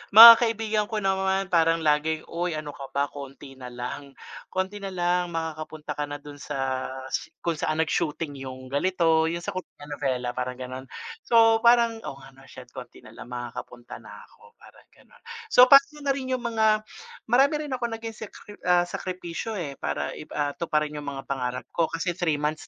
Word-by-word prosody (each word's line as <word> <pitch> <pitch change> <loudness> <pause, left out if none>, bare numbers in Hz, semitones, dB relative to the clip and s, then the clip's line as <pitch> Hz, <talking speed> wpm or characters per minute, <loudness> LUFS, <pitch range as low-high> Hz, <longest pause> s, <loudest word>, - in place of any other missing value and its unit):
Mga 230 +2 +14
kaibigan 220 -2 0
ko 215 - -1
naman 190 0 0
parang 165 -1 +3
laging, 155 +1 +1
"Oy, 170 +1 -2
ano 150 -1 -7
ka 135 -1 -8
ba 140 0 +2
konti 140 -1 -10
na 125 -1 -9
lang, 125 +3 -6 0.4
konti 190 +2 -2
nalang 180 -2 0
makakapunta 155 -2 -5
ka 150 - -1
na 145 - -5
dun 145 0 -10
sa 135 -2 -2 0.6
kung 170 -1 0
saan 155 +1 -1
nag-shooting 155 -1 -2
yung 130 -1 -8
ganito 165 +1 +2
yung 170 - -3
sa - - -2
koreanovela 145 -7 -4
parang 125 0 -3
ganon." 130 +1 -7 0.4
So 225 -1 +5
parang, 235 -1 +4
"Oo 135 - -6
nga, 135 - -13
'no, 135 - -17
shet 125 -1 -12
konti - - -10
na - - -13
lang, 120 - -10
makakapunta 120 0 -7
na - - -12
ako." 465 0 -21
Parang - - -18
ganon, - - -23 0.3
so 250 - +8
pano 280 +2 +7
na 280 - +2
rin 260 -1 -4
yung 250 - -6
mga 220 -2 +2 0.5
marami 270 +5 +5
rin 290 - -8
akong 235 -2 -2
naging 225 0 -7
sekri 205 - -13
ah, 180 -1 +5
sakripisyo, 180 +4 -5
eh, 145 -5 -5
para 75 0 -2
ip 155 - -11
ah, 145 -1 0
tuparin 150 -2 -1
yung 145 - -9
mga 135 -1 -6
pangarap 125 -2 -2
ko 165 -2 +1
kasi 165 +2 -1
3 170 -4 +1
months 150 +1 -3
160 Hz, 185 wpm, -26 LUFS, 140-210 Hz, 0.6 s, Mga